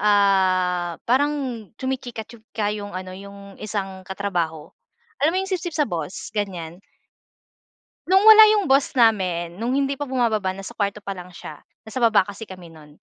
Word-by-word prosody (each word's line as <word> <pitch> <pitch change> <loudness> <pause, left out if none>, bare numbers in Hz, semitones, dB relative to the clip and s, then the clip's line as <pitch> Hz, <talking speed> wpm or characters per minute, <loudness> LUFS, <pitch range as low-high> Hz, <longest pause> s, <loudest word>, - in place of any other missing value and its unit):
ah, 185 -4 +2
parang 285 +5 +2 0.5
chumichika-chika 225 -4 -4
yung 205 -1 -7
ano 185 0 -6
yung 200 0 -12
isang 195 -3 -4
katrabaho. 175 -6 -3 0.5
Alam 305 +3 +3
mo - - +2
yung 385 - -8
sipsip 350 -2 -3
sa 300 - +3
boss? 175 +1 -5
Ganyan. 180 -4 -4 1.3
No'ng 380 +2 +5
wala 435 0 +10
yung 400 -8 0
boss 275 +1 +3
namin, 185 -8 +2
nung 235 +4 -1
hindi 275 0 0
pa 290 - -3
bumababa 220 -7 0
nasa 195 0 -8
kwarto 205 0 -1
pa 200 - -5
lang 180 -2 -8
siya, 150 -3 -9 0.2
nasa 220 +2 -6
baba 225 -4 +5
kasi 205 +3 -9
kami 185 -3 -11
nun. 150 -2 -17
205 Hz, 155 wpm, -23 LUFS, 185-245 Hz, 1.3 s, wala